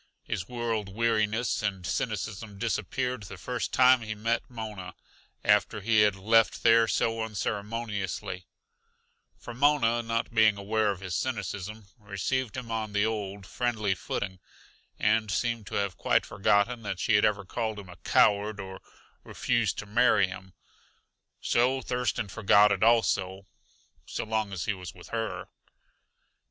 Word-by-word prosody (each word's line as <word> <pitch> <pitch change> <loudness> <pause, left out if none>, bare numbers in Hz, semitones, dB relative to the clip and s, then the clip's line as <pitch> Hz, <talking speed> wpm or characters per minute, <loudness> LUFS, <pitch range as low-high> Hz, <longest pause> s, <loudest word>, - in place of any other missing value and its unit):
His 95 - -4
world 115 -4 -2
weariness 110 +2 0
and 95 -4 -2
cynicism 105 0 -3
disappeared 125 +3 -2
the 95 -1 -9
first 120 +6 -3
time 130 -1 +5
he 110 -1 -5
met 115 +2 0
Mona 105 -6 -7 0.5
after 105 +1 +3
he 110 +1 +3
had 105 -2 +4
left 110 +3 +2
there 115 0 +6
so 115 +1 0
unceremoniously; 105 -3 -3 0.9
for - - -9
Mona, 120 -3 +3
not 115 0 -2
being 110 -2 +5
aware 105 +1 0
of 95 -2 -3
his 95 -2 -5
cynicism, 105 -4 -4
received 105 +4 -2
him 120 -3 -6
on 110 -2 -3
the 105 +1 +2
old, 100 -3 -3
friendly 110 -3 -1
footing, 95 0 -4 0.6
and 110 0 +2
seemed 115 +2 -1
to - - -6
have 100 -2 -1
quite - - +2
forgotten 105 +4 +1
that 100 -4 -4
she 115 - +1
had 105 - +5
ever 105 -2 +1
called 110 +2 -3
him 100 -2 -9
a 90 - -12
coward, 105 0 +2
or 95 -1 -7 0.4
refused 120 -5 0
to - - -5
marry 105 -1 +4
him. 95 0 -9 0.9
So 125 +3 +2
Thurston 120 -3 -1
forgot 105 +1 +4
it 100 -1 0
also 100 -4 +2 0.6
so - - -3
long 110 -2 -1
as 95 -2 -4
he 110 - 0
was 90 -3 -9
with - - -13
her. - - -3
110 Hz, 145 wpm, -28 LUFS, 100-115 Hz, 0.9 s, there